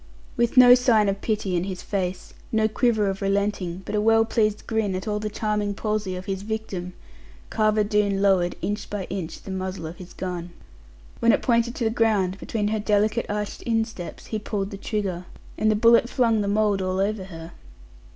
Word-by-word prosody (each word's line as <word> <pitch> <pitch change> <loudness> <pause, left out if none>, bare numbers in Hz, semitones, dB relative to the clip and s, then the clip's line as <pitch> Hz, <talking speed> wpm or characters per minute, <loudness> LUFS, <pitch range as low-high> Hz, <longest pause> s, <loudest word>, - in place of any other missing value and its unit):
With 235 +2 0
no 245 -1 +10
sign 240 -4 +4
of 195 0 -3
pity 210 -4 -1
in 175 +1 0
his 190 -2 -6
face, 185 -2 -3 0.2
no 220 -1 +3
quiver 220 -1 +1
of 195 0 -3
relenting, 195 -2 -1
but - - -5
a 210 - +2
well 225 +1 +4
pleased 215 -2 0
grin 220 -4 -1
at 185 +3 -5
all 210 0 -1
the 215 0 -3
charming 210 -1 -1
palsy 210 -3 -2
of 180 0 -7
his 195 -2 -3
victim, 200 -4 -4 0.6
Carver 215 -1 +2
Doone 205 -2 +1
lowered, 190 -3 +2
inch 205 +1 -3
by 205 -2 -3
inch, 180 -4 -5
the 195 - -7
muzzle 185 -2 -4
of 160 +2 -7
his 180 -1 -11
gun. 180 -2 -5 0.7
When 230 - +5
it - - +1
pointed 235 0 +2
to - - -3
the 220 - +1
ground, 205 -5 +1
between 210 -2 -2
her 220 0 0
delicate 210 +2 +1
arched 210 0 -3
insteps, 225 -6 -2
he 220 - -3
pulled 205 -1 -3
the 200 - -6
trigger, 195 -4 -3 0.3
and 215 - +1
the 215 - +3
bullet 230 +2 +5
flung 230 -5 +2
the 200 - -1
mould 205 -1 +2
all 185 0 -1
over 200 0 -1
her. 165 -2 -9
210 Hz, 200 wpm, -24 LUFS, 190-220 Hz, 0.7 s, no